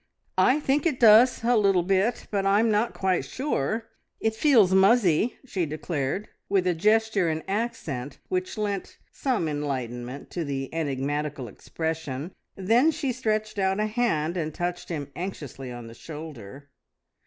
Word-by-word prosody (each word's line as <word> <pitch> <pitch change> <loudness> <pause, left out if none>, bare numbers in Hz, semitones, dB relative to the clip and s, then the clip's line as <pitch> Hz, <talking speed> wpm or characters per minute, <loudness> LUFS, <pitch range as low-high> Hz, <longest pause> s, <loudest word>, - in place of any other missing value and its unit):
"I 270 +4 +5
think 290 +2 +1
it 290 -6 -1
does 230 +2 +6
a 240 +1 +3
little 195 -5 +3
bit, 195 +6 +1
but 200 -2 0
I'm 205 +3 +3
not 215 +3 +1
quite 190 -1 +1
sure. 225 - -2 0.3
It 220 0 0
feels 220 -6 +4
muzzy!" 195 0 +4
she 185 -10 -2
declared, 155 +4 -3 0.2
with 195 -2 +2
a 180 - +3
gesture 215 0 +2
and 160 0 -2
accent 165 - -3
which 370 -6 -2
lent 205 -2 -3
some 250 - -1
enlightenment 130 -3 -4
to 175 - -2
the 135 -2 -4
enigmatical 145 -2 -2
expression. 160 - -4 0.2
Then 230 +10 +3
she 295 -4 -1
stretched 215 -3 -2
out 190 +1 +1
a 215 - +2
hand, 210 -8 0
and 155 -3 -3
touched 175 0 -3
him 145 -4 -4
anxiously 145 -8 -6
on 120 -1 -8
the 115 - -10
shoulder. 145 -2 -10
185 Hz, 150 wpm, -26 LUFS, 150-220 Hz, 0.3 s, does